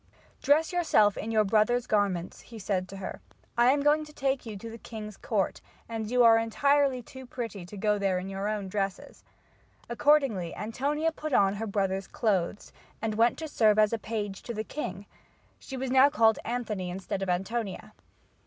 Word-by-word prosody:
"Dress 310 +4 +3
yourself 215 - +3
in 220 - -5
your 220 -1 +3
brother's 220 +4 +2
garments," 200 -6 0
he 230 - -12
said 185 -3 -2
to 195 - -8
her. 190 - -6 0.3
"I 240 0 +4
am 280 +2 +3
going 300 +1 +3
to 300 - -13
take 270 -3 -1
you 215 -2 -6
to 230 - -8
the 230 +1 -9
king's 210 -2 -8
court 200 -3 -1 0.3
and 225 -2 -4
you 250 0 +4
are 225 -1 +7
entirely 275 +3 +2
too 260 +2 -11
pretty 225 -8 -6
to 205 - -10
go 210 +1 +1
there 195 -2 +1
in 180 +1 -4
your 195 +1 -3
own 210 -2 -2
dresses." 195 0 -4 0.7
Accordingly, 235 - +2
Antonia 285 +9 -1
put 310 -2 -5
on 195 -4 +4
her 225 +2 -3
brother's 195 -1 -1
clothes 200 -3 -1 0.3
and 220 -1 -2
went 230 +2 +3
to 320 - -5
serve 220 -7 +3
as 215 +1 +4
a 230 - -1
page 210 -2 -4
to 235 - -6
the 215 - -2
king. 205 -8 -6 0.5
She 265 - -8
was 260 0 -3
now 265 +2 +6
called 225 -7 +3
Anthony 220 -6 -3
instead 190 +2 -4
of 195 - -2
Antonia. 195 +3 -3
220 Hz, 190 wpm, -28 LUFS, 195-250 Hz, 0.7 s, are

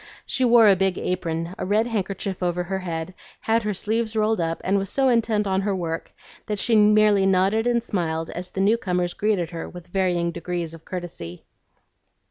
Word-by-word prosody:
She 260 - -1
wore 235 -2 +6
a 200 - +6
big 190 0 0
apron, 170 -1 -2
a - - -2
red 210 +4 +2
handkerchief 195 -4 -3
over 180 0 0
her 190 +2 -3
head, 170 -1 -4 0.3
had 225 +1 +2
her 210 -1 -2
sleeves 220 +3 -1
rolled 215 -2 +1
up, 165 0 -2
and 195 +2 +2
was 195 -1 -3
so 270 -1 +2
intent 225 -3 +2
on 190 -1 +1
her 200 0 -1
work 165 -3 -4 0.4
that 210 -1 -2
she 230 +3 +2
merely 210 -2 +5
nodded 195 +5 +2
and 235 -1 +1
smiled 165 -7 -2
as 180 +1 -5
the 190 - -3
new 210 +4 +4
comers 180 -4 -1
greeted 200 -6 0
her 165 -1 -6
with 175 -1 -11
varying 175 -2 0
degrees 170 -1 -4
of 165 -1 -13
courtesy. 170 - -7
190 Hz, 195 wpm, -23 LUFS, 175-215 Hz, 0.4 s, wore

